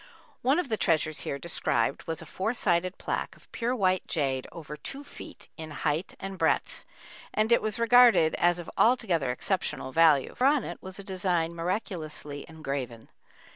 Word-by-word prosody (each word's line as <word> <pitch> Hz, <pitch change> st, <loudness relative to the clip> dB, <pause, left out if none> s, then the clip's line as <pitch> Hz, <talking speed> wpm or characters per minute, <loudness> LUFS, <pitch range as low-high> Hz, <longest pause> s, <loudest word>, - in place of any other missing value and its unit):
One 270 Hz, +5 st, +3 dB
of 355 Hz, -, 0 dB
the 220 Hz, -, 0 dB
treasures 155 Hz, -4 st, +1 dB
here 140 Hz, -, -3 dB
described 140 Hz, -6 st, -1 dB
was 165 Hz, -1 st, -3 dB
a -, -, -12 dB
four 220 Hz, +6 st, -2 dB
sided 185 Hz, -3 st, +1 dB
plaque -, -, -3 dB
of -, -, -23 dB
pure 240 Hz, +2 st, -1 dB
white 185 Hz, -5 st, +1 dB
jade 135 Hz, -5 st, -1 dB
over 150 Hz, -3 st, -8 dB
two 275 Hz, -, -8 dB
feet -, -, -11 dB
in 160 Hz, -1 st, -7 dB
height 150 Hz, +3 st, -2 dB
and 195 Hz, -1 st, -6 dB
breadth, -, -, 0 dB, 0.5 s
and 215 Hz, +2 st, +2 dB
it 235 Hz, -, +5 dB
was 215 Hz, 0 st, -1 dB
regarded 235 Hz, -8 st, +6 dB
as 175 Hz, 0 st, +3 dB
of 175 Hz, -, -8 dB
altogether 205 Hz, -, +3 dB
exceptional 150 Hz, 0 st, -2 dB
value, 155 Hz, -3 st, +4 dB
for 255 Hz, -, +1 dB
on 285 Hz, -3 st, +3 dB
it 175 Hz, -, -7 dB
was 190 Hz, 0 st, -7 dB
a 200 Hz, -, -7 dB
design 180 Hz, -4 st, -1 dB
miraculously 165 Hz, -5 st, -4 dB
engraven. 135 Hz, -7 st, -5 dB
175 Hz, 175 wpm, -28 LUFS, 155-215 Hz, 0.5 s, regarded